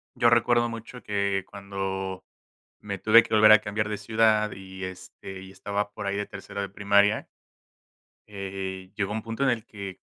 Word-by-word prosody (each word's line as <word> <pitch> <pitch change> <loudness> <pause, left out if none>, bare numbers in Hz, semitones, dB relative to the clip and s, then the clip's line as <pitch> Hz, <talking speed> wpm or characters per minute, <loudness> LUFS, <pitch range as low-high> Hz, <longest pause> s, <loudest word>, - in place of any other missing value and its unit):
Yo 120 - +4
recuerdo 120 0 +3
mucho 115 +2 -8
que 100 -2 0
cuando 95 -1 -4 0.6
me 100 -2 -5
tuve 115 +2 +7
que - - -3
volver 110 0 +8
a 110 - +8
cambiar 105 0 -2
de 105 - -2
ciudad 110 0 +2
y, 95 0 -8
este, 95 +1 -8
y 95 - -11
estaba 100 +2 -3
por 105 -1 -6
ahí 100 0 -1
de 105 - -2
tercero 100 0 -7
de 100 - -2
primaria 100 +2 +3 1.1
eh, 95 -1 -5
llegó 105 -1 -1
un 110 0 -3
punto 115 +3 -5
en 135 - +4
el 120 -2 -1
que 100 -3 -8
100 Hz, 180 wpm, -26 LUFS, 95-110 Hz, 1.1 s, volver